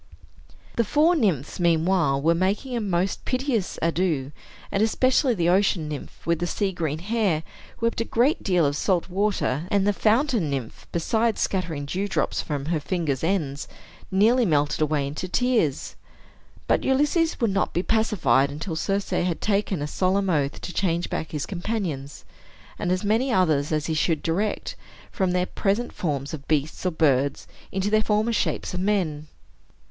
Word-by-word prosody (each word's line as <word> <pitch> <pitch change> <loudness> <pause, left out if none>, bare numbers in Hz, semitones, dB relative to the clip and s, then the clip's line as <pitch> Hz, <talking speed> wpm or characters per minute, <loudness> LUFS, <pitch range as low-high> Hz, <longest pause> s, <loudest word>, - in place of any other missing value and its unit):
The 235 - +4
four 305 - +3
nymphs, 180 - 0
meanwhile, 165 -4 +2
were 160 +4 +3
making 200 +9 -1
a 235 - -1
most 190 -2 -1
piteous 255 -6 -1
ado; 165 -5 0 0.4
and 195 - +1
especially 255 +3 +3
the 170 -3 +1
ocean 185 -3 +2
nymph, 150 -2 -8
with 170 -1 +1
the 175 - -1
sea 200 +2 -1
green 160 -4 -2
hair, 195 -3 0 0.4
wept 230 0 0
a - - -1
great 260 +10 +2
deal 180 -5 +2
of 145 0 0
salt 180 +3 0
water, 185 -6 0
and 200 -1 +2
the 205 - +3
fountain 225 - +2
nymph, 135 -5 -5
besides 220 +7 0
scattering 165 -7 -1
dewdrops 190 +7 -1
from 145 -3 -4
her 160 0 0
fingers' 145 -3 -2
ends, 155 -6 -1 0.4
nearly 220 +6 +4
melted 150 -6 +1
away 150 -2 +1
into 150 +6 -4
tears. 230 - 0 0.7
But - - +1
Ulysses 295 +5 +2
would 230 -4 +2
not 195 - 0
be 175 - -1
pacified 160 - +2
until 160 +4 -5
Circe 195 +4 -1
had 175 -2 0
taken 200 -6 0
a - - -2
solemn 190 +3 +1
oath 145 -3 0
to 180 - -6
change 175 -2 0
back 155 - -3
his 150 -2 -3
companions, 175 -8 -4 0.5
and 175 - -1
as 185 +2 0
many 225 +6 +1
others 160 -9 +2
as 155 -1 0
he 160 - -1
should 155 0 0
direct, 195 +6 -1 0.4
from 190 -1 0
their 180 0 +1
present 205 +5 -1
forms 140 -4 -3
of 145 -2 -7
beast 155 0 -1
or - - +3
bird 140 -5 +2 0.3
into 195 +2 -1
their 215 0 +4
former 215 +2 +1
shapes 210 - -1
of 180 - -2
men. 180 -7 0
180 Hz, 165 wpm, -24 LUFS, 155-210 Hz, 0.7 s, The